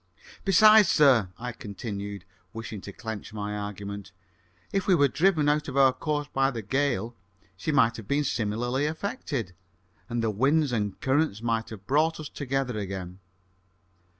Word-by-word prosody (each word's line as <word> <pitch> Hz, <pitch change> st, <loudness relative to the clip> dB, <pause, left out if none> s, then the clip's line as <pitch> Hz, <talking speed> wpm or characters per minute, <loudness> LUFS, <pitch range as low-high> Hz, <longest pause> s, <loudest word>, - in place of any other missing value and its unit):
"Besides, 215 Hz, +1 st, +7 dB
sir," 130 Hz, -, +5 dB
I 125 Hz, +1 st, -5 dB
continued, 100 Hz, -3 st, -6 dB, 0.3 s
wishing 110 Hz, -2 st, -6 dB
to 100 Hz, -, -8 dB
clench 110 Hz, -1 st, -7 dB
my 105 Hz, -1 st, -4 dB
argument, 100 Hz, -1 st, -6 dB, 0.6 s
"if 195 Hz, -1 st, 0 dB
we 190 Hz, -, +5 dB
were 145 Hz, -4 st, +4 dB
driven 155 Hz, +1 st, +2 dB
out 150 Hz, +1 st, +1 dB
of 140 Hz, -1 st, -4 dB
our 135 Hz, -1 st, +6 dB
course 145 Hz, +1 st, -2 dB
by 135 Hz, 0 st, +3 dB
the 115 Hz, -5 st, -5 dB
gale, 120 Hz, -1 st, -1 dB, 0.4 s
she 95 Hz, -, -2 dB
might 115 Hz, -6 st, +3 dB
have 110 Hz, -3 st, -9 dB
been 145 Hz, +3 st, +1 dB
similarly 120 Hz, +3 st, -1 dB
affected, 150 Hz, -, -4 dB, 0.6 s
and 120 Hz, -1 st, -1 dB
the 110 Hz, -, +1 dB
winds 140 Hz, +7 st, +2 dB
and 105 Hz, -4 st, -2 dB
currents 130 Hz, -5 st, +1 dB
might 115 Hz, -1 st, -1 dB
have 100 Hz, -3 st, -10 dB
brought 155 Hz, +6 st, +2 dB
us 155 Hz, -2 st, -6 dB
together 135 Hz, -4 st, -2 dB
again." 95 Hz, -2 st, -6 dB
120 Hz, 155 wpm, -27 LUFS, 105-145 Hz, 0.6 s, Besides